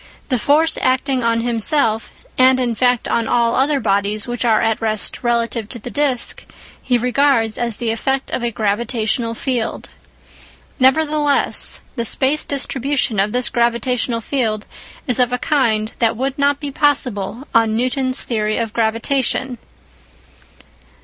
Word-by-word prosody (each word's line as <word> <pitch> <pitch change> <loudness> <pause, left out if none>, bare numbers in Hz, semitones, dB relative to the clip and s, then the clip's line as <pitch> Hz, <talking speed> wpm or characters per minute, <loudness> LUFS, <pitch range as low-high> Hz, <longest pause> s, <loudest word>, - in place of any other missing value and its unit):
The 255 -3 +1
force 310 +7 +3
acting 260 0 +1
on 230 0 +1
himself, 230 0 +1 0.2
and 260 0 +4
in 245 -2 0
fact 245 +1 +1
on 230 -1 0
all 235 0 +2
other 280 +2 +2
bodies 205 -1 -1
which 240 0 -3
are 225 -3 +3
at 225 0 0
rest 215 -2 0
relative 235 -2 -1
to - - -6
the 240 +2 -9
disc, 280 -4 0 0.4
he 250 -1 +1
regards 250 -2 +2
as 235 -3 -2
the 235 -2 -1
effect 270 +4 -2
of - - -2
a 240 - +1
gravitational 230 +1 -1
field. 245 -2 -3 0.9
Nevertheless, 295 +2 +1 0.2
the 235 - 0
space 270 +6 +1
distribution 275 -4 -1
of 200 +2 +1
this 250 +1 +1
gravitational 235 0 0
field 220 -5 -2 0.4
is 250 -1 +4
of 250 -1 +3
a 250 - 0
kind 230 -7 0
that 230 -1 +1
would 265 +2 -2
not 285 0 +1
be 290 -1 -5
possible 260 -5 0
on 225 -1 +3
Newton's 255 +1 0
theory 215 -2 -1
of 225 -2 -3
gravitation. 240 +2 0
240 Hz, 145 wpm, -18 LUFS, 225-265 Hz, 0.9 s, and